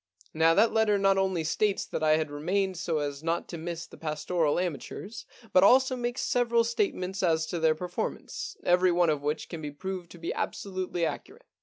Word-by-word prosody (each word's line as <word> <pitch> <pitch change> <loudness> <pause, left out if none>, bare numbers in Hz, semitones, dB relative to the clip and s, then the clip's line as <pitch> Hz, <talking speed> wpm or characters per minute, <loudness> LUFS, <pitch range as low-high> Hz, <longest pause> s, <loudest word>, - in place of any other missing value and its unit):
Now 165 +1 +4
that 220 +3 +4
letter 220 -2 +3
not 195 -1 +3
only 190 -4 0
states 200 +5 0
that - - -4
I 155 0 +4
had 155 -2 -2
remained 185 +6 -1
so 170 -2 -1
as 145 -1 -3
not 165 +1 -1
to 170 - -5
miss 170 0 -5
the - - -15
pastoral 155 0 0
amateurs, 185 +5 -5 0.3
but 185 - +6
also 260 +4 +5
makes 245 0 -2
several 235 -1 +2
statements 195 -4 -1
as 160 -3 +2
to 170 +2 -3
their 160 -1 +3
performance, 180 +2 -5
every 180 +1 +4
one 175 -2 +3
of 150 -2 -2
which 150 +2 -2
can 165 - -7
be 150 - -4
proved 180 +4 -6
to - - -12
be 165 0 -4
absolutely 185 -3 -2
accurate. 420 - -6
180 Hz, 195 wpm, -28 LUFS, 160-200 Hz, 0.3 s, but